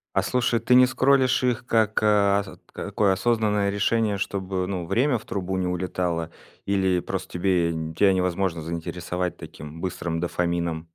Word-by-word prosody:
А - - +3
слушай, 120 -2 +1
ты 120 +2 +1
не 125 0 +7
скроллишь 130 0 +3
их 120 -1 0
как, 110 -1 +2
э, 100 -2 +3
ос 95 - -11 0.2
такое 100 -2 0
осознанное 105 -1 +1
решение, 105 +1 +1
чтобы, 95 -1 -2
ну, 90 -3 -4
время 120 +5 +2
в - - -16
трубу 95 -1 -3
не 90 -1 -1
улетало, 90 -2 -2 0.3
или 95 -2 +1
просто - - -5
тебе 90 -2 +1
нь 80 0 -4
тя 100 +2 +4
невозможно 90 -2 -1
заинтересовать 90 +2 -4
таким 75 +2 -10
быстрым 85 -3 -3
дофамином? 85 -1 -2
95 Hz, 160 wpm, -24 LUFS, 85-110 Hz, 0.3 s, не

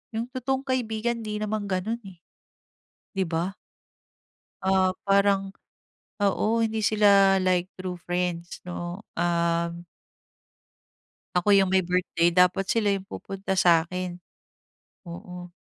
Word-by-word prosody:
yung 230 +2 -3
totoong 265 +1 -1
kaibigan 235 -2 -1
‘di 210 0 -3
naman 215 0 -2
gano'n, 195 +5 -1
eh. 180 -3 -13 0.9
‘Di 195 -2 0
ba? 170 +4 -2 1.1
Ah, 190 -1 +3 0.2
parang 195 0 +3 0.7
oo, 215 +3 +2
hindi 220 0 -1
sila, 200 -2 +5
like 180 -1 +2
true 185 -1 -6
friends, 175 -1 -3
'no, 175 +2 -6 0.2
um 170 0 0 1.5
Ako 200 +3 +4
yung 195 -1 +4
may 190 - +5
birthday, 180 -1 +1
dapat 180 +2 +3
sila 215 -3 +2
yung 195 -1 -3
pupunta 195 -1 -4
sa'kin. 180 0 +2 0.9
Oo. 175 0 -9
190 Hz, 110 wpm, -26 LUFS, 175-210 Hz, 1.5 s, sila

